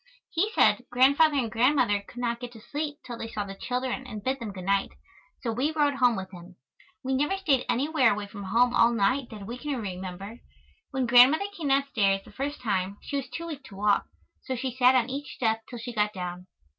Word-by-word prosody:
He 385 +6 +1
said 250 - +4
Grandfather 280 +5 +4
and 235 -5 0
Grandmother 235 -3 +3
could 220 - -17
not 235 -1 -1
get 245 -1 -7
to 225 - -12
sleep 290 +5 -4
till 240 -2 -7
they 225 - -4
saw 215 -2 -3
the 195 -1 -7
children 255 +4 -3
and 215 -4 -7
bid 265 +1 -1
them 225 -4 -5
good 185 -2 -8
night. 195 0 +1 0.5
So 235 - -2
we 260 +7 0
rode 295 -2 +2
home 250 -3 +3
with 190 -2 -6
him. 180 0 -12 0.5
We 265 +1 -1
never 295 +8 +1
stayed 290 -10 +1
anywhere 270 -1 +3
away 205 0 -4
from 200 -1 -9
home 240 +5 +3
all 230 +1 +5
night 235 +4 +1
that 210 -3 -9
we 240 +4 -6
can 290 -3 -3
remember. 190 +2 -6 0.5
When 265 -2 -1
Grandmother 250 +10 +6
came 320 -4 -4
downstairs 245 -8 +2
the - - -14
first 285 +2 -4
time 200 -3 -1
she 285 - -4
was 270 -2 -4
too 335 - -6
weak 300 -4 -7
to 195 - -12
walk, 205 +1 +2 0.3
so 260 - -4
she 255 +1 -3
sat 255 0 +5
on 245 -2 +3
each 275 +1 -6
step 225 -2 0
till 245 - -7
she 235 +1 -6
got 210 -1 +1
down. 180 -1 -6
245 Hz, 220 wpm, -27 LUFS, 210-270 Hz, 0.5 s, Grandmother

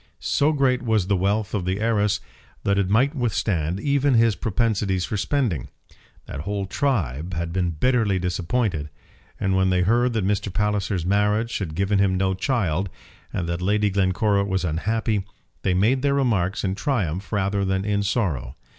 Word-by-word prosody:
So 145 +2 +1
great 135 -4 +2
was 110 -5 +1
the 100 +1 +1
wealth 100 +3 0
of 100 -4 -1
the 95 +2 -1
heiress 105 -2 +1 0.4
that 100 0 +2
it 95 -2 0
might 130 +8 +3
withstand 100 - -1
even 140 +2 +2
his 115 -2 +4
propensities 100 -4 0
for - - -4
spending. 105 - 0 0.6
That - - -7
whole 100 +5 -3
tribe 90 - -1
had 85 0 -3
been 90 -1 0
bitterly 115 -5 +2
disappointed; 90 -2 -1 0.5
and 95 -1 +1
when 95 0 +3
they 90 -1 +2
heard 120 +5 +2
that 110 -4 0
Mr. 100 0 0
Palliser's 105 -3 -1
marriage 105 +4 +1
had 80 -6 -4
given 100 +2 +1
him 95 -2 +2
no 95 0 +1
child, 95 - 0 0.4
and 85 -3 -3
that 85 +1 -2
Lady 105 +2 +1
Glencora 100 +1 +2
was 95 -2 -1
unhappy, 105 +5 0 0.4
they 95 -2 +1
made 115 +8 +2
their 140 0 +2
remarks 105 -8 +1
in 95 -1 0
triumph 100 - -2
rather 100 -1 0
than 95 0 0
in 105 -1 +1
sorrow. 95 - -1
100 Hz, 170 wpm, -23 LUFS, 95-115 Hz, 0.6 s, his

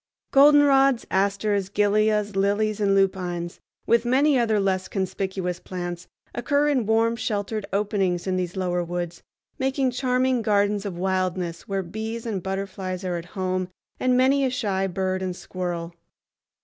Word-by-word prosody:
Goldenrods, 275 -2 +5
asters, 200 0 +1
gilias, 210 0 +1
lilies, 205 +2 +1
and 200 -1 +3
lupines, 180 -3 -1 0.3
with 235 0 +3
many 270 +4 +3
other 225 -4 +2
less 190 -1 0
conspicuous 190 -2 -3
plants, 175 -1 -6 0.3
occur 285 +4 +1
in 255 -7 +1
warm 225 +1 +2
sheltered 210 -2 -3
openings 195 -3 0
in 190 -1 0
these 180 0 -2
lower 180 -2 -1
woods, 175 -1 -4 0.4
making 265 0 +1
charming 255 0 +1
gardens 205 -1 +1
of 180 -3 -6
wildness 185 -2 -2
where 195 -1 -1
bees 220 +5 -5
and 210 -5 -2
butterflies 190 -1 -4
are 180 -1 -1
at 170 - -7
home 185 -1 -1 0.3
and 255 -1 +2
many 270 +2 +4
a 265 - +2
shy 205 -7 -1
bird 185 0 -2
and 185 -1 -3
squirrel. 175 -2 -5
195 Hz, 145 wpm, -24 LUFS, 185-230 Hz, 0.4 s, Goldenrods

